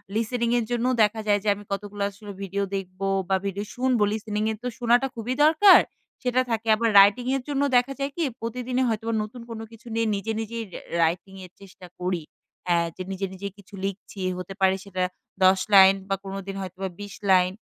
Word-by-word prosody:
Listening 230 +1 0
এর 230 - -2
জন্যও 245 +2 +1
দেখা 215 +1 +1
যায় 205 0 +4
যে - - -5
আমি 205 - -11
কতগুলো 205 0 -4
আসলে 205 +1 -11
ভিডিও 195 +1 -2
দেখব? 185 -1 -6 0.3
বা 190 - +3
ভিডিও 200 +1 -3
শুনবো? 250 -3 +2
লিসেনিং 215 -1 -2
এ - - -2
তো 250 - -2
শোনাটা 245 +3 +3
খুবই 235 +2 -3
দরকার, 320 +6 +8 0.4
সেটা 250 0 +2
থাকে। 225 0 -2
আবার 230 +1 +1
রাইটিং 205 +5 +5
এর 255 - -7
জন্য 280 -1 0 0.2
দেখা 250 +3 +1
যায় 275 0 -2
কি? 335 - +1 0.2
প্রতিদিনই 250 +2 -1
হয়তোবা 225 +1 -2
নতুন 235 +3 -9
কোনো 225 -1 -6
কিছু 230 +2 -15
নিয়ে 225 0 +1
নিজে, 210 +3 -3
নিজেই 225 +1 -4
রা - - -6 0.2
রাইটিং 175 +4 -1
এর 180 - -15
চেষ্টা 185 -2 -13
করি। 180 -2 -2 0.4
হা 175 - +3 0.2
যে 185 - -5
নিজে, 195 +1 -2
নিজে 200 +2 -6
কিছু 200 0 -18
লিখছি 195 +1 -6 0.2
হতে 180 +1 -6
পারে 190 0 +4
সেটা 185 -2 -3 0.4
১০ 190 0 +6
লাইন 195 0 +9
বা 195 - +2
কোনোদিন 195 0 -6
হয়তোবা 190 +1 -5
২০ 205 -1 -7 0.2
লাইন, 185 -1 +5
210 Hz, 195 wpm, -25 LUFS, 195-235 Hz, 0.4 s, লাইন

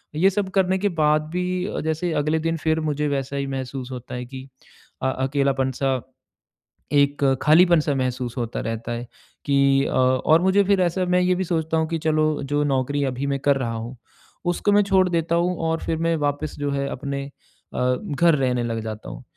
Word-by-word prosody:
ये 185 +5 +4
सब 195 0 -1
करने 190 -1 +3
के 205 +1 +1
बाद 150 0 +4
भी 180 0 -1
अ, - - -3
जैसे 160 +2 -1
अगले 155 +1 +1
दिन 165 +1 -1
फिर 160 0 0
मुझे 150 -1 -1
वैसा 140 0 -2
ही 140 - -2
महसूस 130 -1 -5
होता 125 -1 -7
है 125 - -5
कि 130 +1 -9 0.6
अ, 130 - +2
अकेलापन 135 0 0
सा 135 -2 +1 0.9
एक 145 0 +2 0.2
खालीपन 170 +2 +5
सा 145 - -1
महसूस 125 -2 -2
होता 120 -1 -3
रहता 115 +1 -4
है 120 +1 -5 0.4
कि 140 -1 +3
अ, - - -2
और 130 +5 +3
मुझे 190 +2 +4
फिर 195 -1 +3
ऐसा 180 +1 +1
मैं 180 0 +2
ये 180 0 +2
भी 190 - -1
सोचता 160 -1 -1
हूँ 160 0 +1
कि 165 - -1
चलो 155 0 +2 0.2
जो 145 +2 0
नौकरी 145 0 0
अभी 130 +1 -2
मैं 140 0 -1
कर 140 0 +2
रहा 120 -3 -2
हूँ 115 +3 -6 0.6
उसको 205 +4 0
मैं 205 - +5
छोड़ 190 -1 +3
देता 170 -1 0
हूँ 175 +2 +1
और 165 0 0
फिर 160 - -1
मैं 165 0 +1
वापस 145 +1 -2
जो 145 0 -1
है 140 0 -1
अपने 140 0 -4 0.5
अ, 125 0 +1 0.2
घर 170 +1 +4
रहने 125 -3 0
लग 115 -1 -2
जाता 110 - -6
हूँ - - -9
145 Hz, 205 wpm, -23 LUFS, 130-165 Hz, 0.9 s, खालीपन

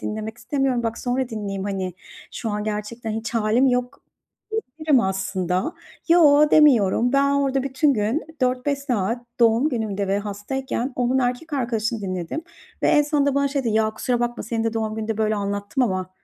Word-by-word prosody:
dinlemek 220 +1 -5
istemiyorum. 260 0 0
Bak, 230 0 -2
sonra 250 0 -1
dinleyeyim, 200 -4 -4
hani, 190 -3 -3 0.4
şu 225 - -4
an 210 0 -2
gerçekten 215 +2 -4
hiç 220 +2 -4
hâlim 230 +3 +3
yok." 250 +1 0 0.5
diyebilirim 310 - +1
aslında. 190 - -1 0.4
Yo, 300 -3 +6
demiyorum. 245 -5 +5
Ben 280 0 +4
orada 275 -1 +1
bütün 275 +2 +2
gün 220 +8 0 0.2
4-5 255 +2 +1
saat 240 -3 -2
doğum 235 +5 +4
günümde 205 -5 -2
ve 195 +1 +1
hastayken 235 +5 -3
onun 250 +1 +1
erkek 250 +5 -2
arkadaşını 230 -3 -1
dinledim 185 - -4 0.4
ve - - +3
en 295 - +5
sonunda 285 -1 +1
bana 280 0 +2
şey 275 -1 -2
dedi, 230 - +1
"Ya, 220 0 +2
kusura 240 +3 -1
bakma. 240 0 -2
Senin 225 +1 -2
de 225 - 0
doğum 220 -1 -2
gününde 220 0 -3
böyle 215 0 +1
anlattım 205 +5 -2
ama." 185 -5 -1
235 Hz, 170 wpm, -23 LUFS, 210-270 Hz, 0.5 s, Yo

